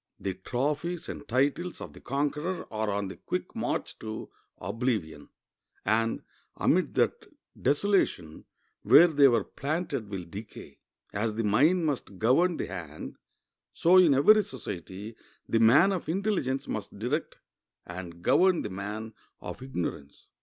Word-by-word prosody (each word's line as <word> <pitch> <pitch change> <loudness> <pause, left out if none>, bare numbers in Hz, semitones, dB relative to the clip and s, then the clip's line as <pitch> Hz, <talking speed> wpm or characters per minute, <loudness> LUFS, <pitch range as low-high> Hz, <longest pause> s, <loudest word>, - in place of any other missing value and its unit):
The 95 - -2
trophies 150 - -2
and 145 - -7
titles 145 +8 0
of - - -8
the - - -13
conqueror 150 +6 -2
are 110 0 -1
on 100 -1 -1
the 95 - -8
quick - - -4
march - - -3
to 110 0 -7 0.3
oblivion, 100 - -3 0.6
and 115 +2 +1 0.3
amid - - +2
that - - +1 0.3
desolation 145 - +1 0.4
where 170 - +8
they 145 -4 +5
were 120 -3 +3
planted 145 - -3
will 95 -3 -4
decay. 100 +4 -10 0.3
As 105 +1 -1
the 115 - -1
mind 150 - +3
must 135 -9 -3
govern 155 - +3
the - - -2
hand, 80 -3 -7 0.6
so 180 +3 +5
in 170 -7 +6
every 215 +11 +6
society 105 - -7 0.3
the 115 - +2
man 135 - +6
of 180 -5 -3
intelligence 170 -8 -1
must 105 -2 -5
direct 125 +9 -2 0.5
and 90 -1 -8
govern 185 -2 +4
the 105 - -5
man 105 +3 -5 0.3
of - - -8
ignorance. 90 - -5
120 Hz, 140 wpm, -28 LUFS, 100-155 Hz, 0.6 s, where